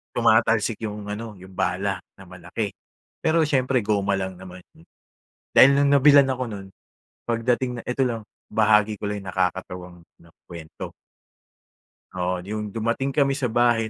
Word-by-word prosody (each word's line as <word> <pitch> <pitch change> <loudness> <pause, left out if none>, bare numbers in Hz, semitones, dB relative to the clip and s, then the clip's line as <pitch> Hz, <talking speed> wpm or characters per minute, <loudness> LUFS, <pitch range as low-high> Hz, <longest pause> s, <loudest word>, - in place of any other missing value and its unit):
tumatalsik 115 -1 +3
'yung 105 0 -6
ano, 110 0 -6
yung 95 +1 -14
bala 95 +1 -1 0.2
na 95 - -14
malaki, 90 +3 -5 0.5
pero 160 0 +2
siyempre 130 -5 +1
goma 100 -1 +1
lang 95 -1 -4
naman. 95 -1 -11 0.9
Dahil 140 +2 +7
no'ng 140 0 +3
nabilhan 140 -1 +6
ako 130 -1 -1
no'n, 100 -4 -7 0.6
pagdating 120 +1 -1
na - - -9
ito 125 +2 0
lang, 115 -3 -2 0.3
bahagi 105 -1 +3
ko 105 - -3
lang 105 -1 -4
nakakatawang 90 -1 -3 0.2
'no, 85 - -20
kuwento. 85 -3 -9 1.2
Oo. 90 0 -1
'Yong 105 +1 -4
dumating 115 +6 -1
kami 140 -2 +3
sa 135 -4 -1
bahay 120 -1 +2
105 Hz, 145 wpm, -24 LUFS, 95-125 Hz, 1.2 s, Dahil